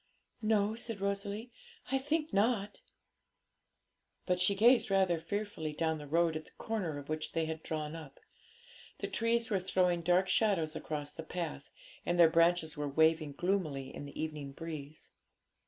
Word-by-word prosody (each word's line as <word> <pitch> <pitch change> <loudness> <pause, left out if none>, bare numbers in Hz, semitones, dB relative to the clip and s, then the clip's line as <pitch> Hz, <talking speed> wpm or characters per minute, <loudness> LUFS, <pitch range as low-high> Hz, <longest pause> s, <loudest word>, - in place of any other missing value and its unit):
'No,' 215 -1 +2
said 230 -2 -4
Rosalie; 200 +4 -2 0.4
'I 270 - +3
think 305 +3 -1
not.' 205 0 +1 1.4
But 180 -1 +1
she 200 +2 +4
gazed 235 +4 +5
rather 190 -3 +3
fearfully 205 -5 -3
down 160 0 0
the 150 - -8
road 165 +2 +2
at 155 0 -4
the - - -18
corner 190 -10 -2
of 145 0 -8
which 155 0 -3
they 165 -1 +1
had 160 0 -4
drawn 155 0 -3
up. 150 -4 -10 0.8
The - - -3
trees 230 0 +1
were 195 - +3
throwing 180 -2 +1
dark 180 +3 +3
shadows 170 -8 +2
across 145 -2 -4
the - - -7
path, 160 -3 -5 0.3
and 175 - 0
their 165 -2 +7
branches 165 -1 +3
were 145 -1 -2
waving 160 0 +3
gloomily 155 -6 -1
in - - -6
the 140 - -9
evening 150 -3 -4
breeze. 155 -1 -8
170 Hz, 160 wpm, -33 LUFS, 155-200 Hz, 1.4 s, their